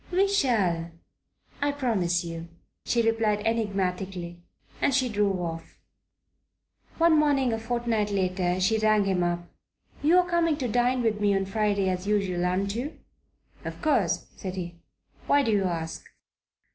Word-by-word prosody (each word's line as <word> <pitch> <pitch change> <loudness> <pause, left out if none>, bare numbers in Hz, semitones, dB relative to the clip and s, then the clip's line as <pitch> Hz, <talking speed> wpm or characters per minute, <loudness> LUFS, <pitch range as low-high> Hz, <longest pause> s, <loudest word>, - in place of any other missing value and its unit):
"We 375 +3 +3
shall, 210 - +1 0.7
I 285 0 +2
promise 195 -11 0
you," 165 0 -6 0.4
she 235 -1 +2
replied 225 -2 +1
enigmatically; 190 -5 -2 0.4
and 275 - +2
she 260 -2 +2
drove 205 -3 +1
off. 165 -2 -6 1.2
One 330 -2 +5
morning, 275 -5 +2
a 225 - -2
fortnight 225 -2 -1
later, 185 -2 0
she 220 +4 +2
rang 215 -1 +3
him 190 -2 +1
up. 175 0 -2 0.5
"You're 350 +4 +4
coming 335 -3 +1
to 260 -4 -2
dine 245 +2 +1
with 215 -2 0
me 205 -1 +3
on 195 0 0
Friday, 200 -1 0
as 185 +1 -2
usual, 195 -4 0
aren't 195 +2 -1
you?" 255 +7 -4 0.7
"Of - - -6
course," 250 - +1
said 185 -1 -6
he. 175 -2 -6 0.5
"Why 285 0 +4
do 225 - +1
you 200 -2 +2
ask?" 165 -2 -3
210 Hz, 145 wpm, -27 LUFS, 180-245 Hz, 1.2 s, One